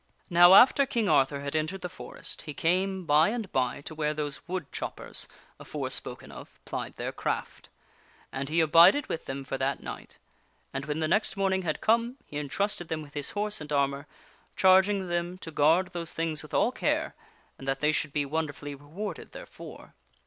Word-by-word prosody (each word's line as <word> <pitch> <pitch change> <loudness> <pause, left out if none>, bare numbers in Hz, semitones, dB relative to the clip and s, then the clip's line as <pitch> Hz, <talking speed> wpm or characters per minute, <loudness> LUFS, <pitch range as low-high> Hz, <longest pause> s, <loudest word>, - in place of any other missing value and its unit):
Now 175 +2 +8
after 270 +5 +7
King 235 -5 0
Arthur 140 -3 +3
had 140 +1 -4
entered 155 +5 -1
the - - -3
forest, 180 - -7
he 150 - -8
came 185 +3 0
by 155 +3 +5
and 220 -4 -4
by 130 +1 0
to 155 - -8
where 150 -1 -1
those 150 0 -3
wood 180 -4 -4
choppers, - - -4 0.3
afore - - -4
spoken - - -4
of, - - -12
plied - - -5
their - - -4
craft. - - -4 0.6
And 135 +1 -4
he 165 +2 +2
abided 165 - +6
with 165 - -4
them 135 +1 -5
for 135 0 -4
that 135 +1 -1
night; - - -8 0.6
and 135 +1 -3
when 150 +1 -2
the 155 - +1
next 210 +5 +1
morning 190 -1 +1
had 160 -4 -3
come, 235 +3 +2
he 145 - -7
intrusted 175 +5 -2
them 160 -1 -3
with 145 -1 -14
his 145 -1 -2
horse 210 -3 -1
and 150 0 -8
armor, 140 0 0 0.5
charging 190 +1 +4
them 175 +1 -2
to 165 - -8
guard 160 +5 +3
those 170 -3 -5
things 160 -2 -2
with - - -8
all - - +3
care, - - -1 0.5
and 135 - -9
that 135 0 0
they 150 +2 +3
should 155 -1 -1
be 145 0 0
wonder 155 +1 -2
j^ - - -22
ingArthur - - -16
fully 145 0 -6
rewarded 160 +7 -7
therefor. - - -11
160 Hz, 200 wpm, -28 LUFS, 145-190 Hz, 0.6 s, Now